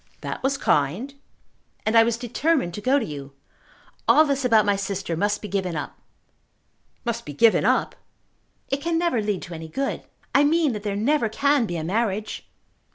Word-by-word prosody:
"That - - -5
was 275 +1 0
kind." 185 - 0 0.7
"And 215 +2 +1
I 230 - +9
was 230 0 +1
determined 250 - 0
to 210 - -6
go 260 +6 +3
to 270 - -1
you. 140 -2 -8 0.7
All 310 - +6
this 280 -2 -1
about 225 -4 +4
my 205 -1 +2
sister 195 -3 -3
must 205 +5 -1
be - - -4
given 190 -4 -2
up." 150 - -5 1.1
"Must 235 -1 -2
be 145 - -8
given 220 +10 +4
up?" - - +1 0.7
"It 275 +1 -1
can 335 +1 0
never 335 -9 +1
lead 205 -3 -2
to 175 - -8
any 160 0 -7
good. 270 +12 -3 0.3
I 280 - +5
mean 305 -2 +2
that 210 - -5
there 205 -1 -3
never 235 +3 +1
can 280 +1 +2
be 175 - -3
a 160 - -3
marriage." 210 +3 -2
220 Hz, 185 wpm, -24 LUFS, 195-275 Hz, 1.1 s, I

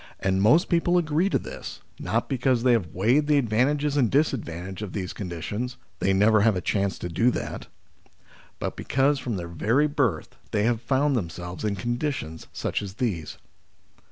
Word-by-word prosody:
And 95 0 +1
most 145 - +5
people 175 0 +2
agree 165 +2 +2
to - - +2
this, - - -8 0.2
not - - -1
because 130 -2 +1
they 130 - +5
have 115 -8 +2
weighed 125 +11 +2
the 150 -1 +4
advantages 140 +4 +1
and 125 -6 +3
dis 145 +2 +3
advantages 95 -4 -6
of 100 - -6
these 95 -3 -4
conditions 105 +7 -4 0.2
(they 95 - +2
never 105 +2 +4
have 110 -1 +4
a - - 0
chance 100 +1 0
to - - -5
do 100 +9 +2
that), - - -4 0.9
but - - -4
because 140 +2 +1
from 125 -4 -3
their 85 -2 -4
very 115 - +2
birth 130 - -1
they 105 - 0
have 115 0 +1
found 135 +3 +1
themselves 90 -3 -4
in 105 -2 0
con 120 +5 -2
ditions 125 - -4
such - - -2
as 100 -2 -7
these. 95 -11 -2
115 Hz, 185 wpm, -25 LUFS, 95-140 Hz, 0.9 s, most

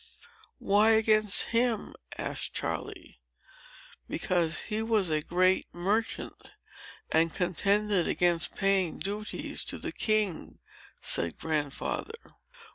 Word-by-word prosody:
"Why 210 +3 +4
against 215 -2 +4
him?" 230 -2 0 0.2
asked - - -2
Charley. - - -5 0.9
"Because 170 -3 0
he 215 0 -3
was 220 -6 +1
a 155 0 +1
great 185 +4 +1
merchant, 205 +6 -3 0.6
and 165 +1 +3
contended 195 +2 +1
against 175 -2 +1
paying 195 -3 +1
duties 210 +2 -2
to - - -2
the - - -5
king," 215 -6 -1 0.5
said 85 -1 0
Grandfather. 155 - -4
195 Hz, 100 wpm, -29 LUFS, 170-215 Hz, 0.9 s, Why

